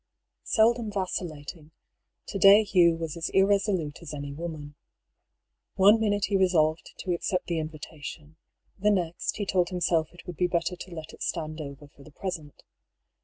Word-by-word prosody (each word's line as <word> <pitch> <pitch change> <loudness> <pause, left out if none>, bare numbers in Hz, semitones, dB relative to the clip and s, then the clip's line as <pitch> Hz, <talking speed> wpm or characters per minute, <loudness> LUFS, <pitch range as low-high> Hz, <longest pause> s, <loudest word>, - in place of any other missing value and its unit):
Seldom 225 -1 +3
vacillating, 165 -5 -4 0.6
to 200 - -5
day 200 +3 +8
Hugh 175 -5 +4
was 165 -2 -4
as 165 -1 -3
irresolute 195 -6 +2
as 155 -3 -7
any 140 -1 -6
woman. 155 -2 -6 1.0
One 205 +4 +6
minute 205 -2 +1
he 200 - -1
resolved 165 -4 +2
to 180 - -1
accept 180 +1 -1
the 170 -2 -1
in 155 0 -3
vitation, 155 0 -9 0.4
the 210 +2 +3
next 175 -5 -1
he 205 - -2
told 180 -2 +1
himself 170 -3 0
it 175 -1 -15
would 180 -4 -8
be 180 - +2
better 175 +1 -1
to 180 0 -9
let 160 -1 -8
it - - -15
stand 155 -1 -3
over 140 0 -9
for 140 - -20
the 155 - -14
present. 160 -2 -6
170 Hz, 170 wpm, -27 LUFS, 155-190 Hz, 1.0 s, day